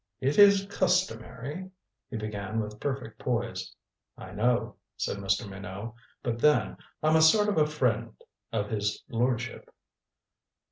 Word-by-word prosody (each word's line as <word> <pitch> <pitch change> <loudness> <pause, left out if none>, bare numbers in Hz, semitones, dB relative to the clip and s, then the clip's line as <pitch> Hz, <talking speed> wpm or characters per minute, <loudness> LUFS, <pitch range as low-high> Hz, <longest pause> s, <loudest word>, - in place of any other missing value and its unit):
"It 135 +5 +1
is 200 -1 +7
customary 180 - -1 0.2
" - - -58
he 115 - -4
began 105 0 -3
with 105 -1 -5
perfect 130 -5 -4
poise. 120 - -2 0.5
"I - - -9
know," 120 +4 0 0.2
said - - -2
Mr. 100 +3 0
Minot. 100 +3 -7 0.3
"But 120 -1 -2
then, 150 +4 +3 0.3
I'm 155 +1 +5
a - - +4
sort 210 +7 +6
of 200 - +2
a 150 - +4
friend 115 -7 0 0.4
of 105 -2 -2
his 105 -1 -1
lordship." 125 +1 -1
120 Hz, 140 wpm, -28 LUFS, 105-150 Hz, 0.5 s, is